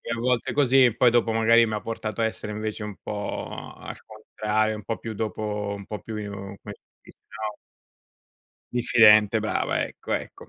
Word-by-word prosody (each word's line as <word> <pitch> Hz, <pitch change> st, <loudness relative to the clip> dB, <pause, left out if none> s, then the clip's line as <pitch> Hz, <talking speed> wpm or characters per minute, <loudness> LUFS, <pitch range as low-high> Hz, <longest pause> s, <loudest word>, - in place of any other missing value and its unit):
a -, -, -5 dB
volte 125 Hz, -1 st, 0 dB
così 135 Hz, -2 st, +5 dB
e 115 Hz, -2 st, +2 dB
poi 125 Hz, -2 st, +5 dB
dopo, 120 Hz, -1 st, +2 dB
magari, 115 Hz, +1 st, +5 dB
mi 110 Hz, -, -3 dB
ha 105 Hz, -, -2 dB
portato 115 Hz, 0 st, -4 dB
a -, -, +3 dB
essere, 110 Hz, -1 st, -4 dB
invece, 110 Hz, 0 st, -4 dB
un 105 Hz, -2 st, -6 dB
po' 105 Hz, -1 st, -5 dB
al -, -, -8 dB
contrario, 110 Hz, 0 st, -2 dB
un 105 Hz, -, -8 dB
po' 115 Hz, -, -3 dB
più 115 Hz, -1 st, -6 dB
dopo 105 Hz, -1 st, -3 dB
un 100 Hz, -1 st, -9 dB
po' 105 Hz, -, -6 dB
più, 110 Hz, -, -7 dB, 0.2 s
come 100 Hz, 0 st, -8 dB, 0.2 s
si -, -, -21 dB, 0.2 s
dice, -, -, -17 dB
no 110 Hz, -1 st, -5 dB, 1.2 s
diffidente. 110 Hz, -3 st, +5 dB
Brava, 110 Hz, 0 st, 0 dB
ecco, -, -, -5 dB
ecco. -, -, -5 dB
110 Hz, 185 wpm, -25 LUFS, 105-115 Hz, 1.2 s, così